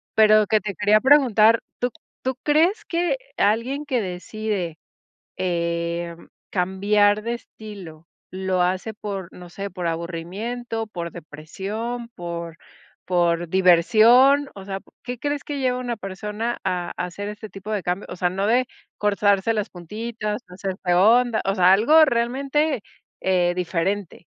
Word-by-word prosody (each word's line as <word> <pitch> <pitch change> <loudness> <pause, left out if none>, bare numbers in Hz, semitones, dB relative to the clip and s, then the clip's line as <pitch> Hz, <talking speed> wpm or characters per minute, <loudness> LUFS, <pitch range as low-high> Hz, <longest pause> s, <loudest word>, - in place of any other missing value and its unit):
Pero, 215 -1 +6
que 215 +1 +3
te 205 -1 -5
quería 210 +1 +4
preguntar, 235 -5 +5 0.2
¿tú 245 - 0 0.3
tú 260 -1 -1
crees 340 +9 +2
que 350 +7 0 0.2
alguien 230 +8 +1
que 260 -4 0
decide, 185 -2 -4 0.6
eh, 170 -1 -2 0.3
cambiar 205 +3 +2
de 235 +2 -2
estilo, 190 -9 -11 0.2
lo 185 -1 -1
hace 185 +5 -1
por, 195 -4 -6
no 180 -1 -11
sé, 200 +3 -6
por 180 -2 -6
aburrimiento, 200 +8 -4
por 170 -4 -6
depresión, 200 +10 -6
por 170 -1 -6 0.5
por 175 -2 +1
diversión. 225 - +5
O 195 - -9
sea, 195 0 -4 0.2
¿qué 245 -1 -5
crees 290 +1 -2
que 290 -2 -4
lleva 255 -1 +1
una 240 -3 -3
persona, 210 +4 -4
a 180 -2 -2
a 180 - -1
hacer 200 +3 -6
este 210 0 -8
tipo 200 +2 -8
de 205 -3 -1
cambio? 180 +3 -2
O - - -6
sea, 180 0 0
no 195 +3 -1
de 250 +3 +3 0.3
cortarse 205 +1 +2
las 210 0 -2
puntitas, 210 +5 -5
hacerse 185 -1 -3
onda, 225 +5 +4
o 195 - +1
sea, 185 +1 +6
algo 310 +10 +6
realmente, 270 +2 0 0.4
eh, 180 -2 +2
diferente. 180 +1 -2
205 Hz, 145 wpm, -23 LUFS, 180-235 Hz, 0.6 s, Pero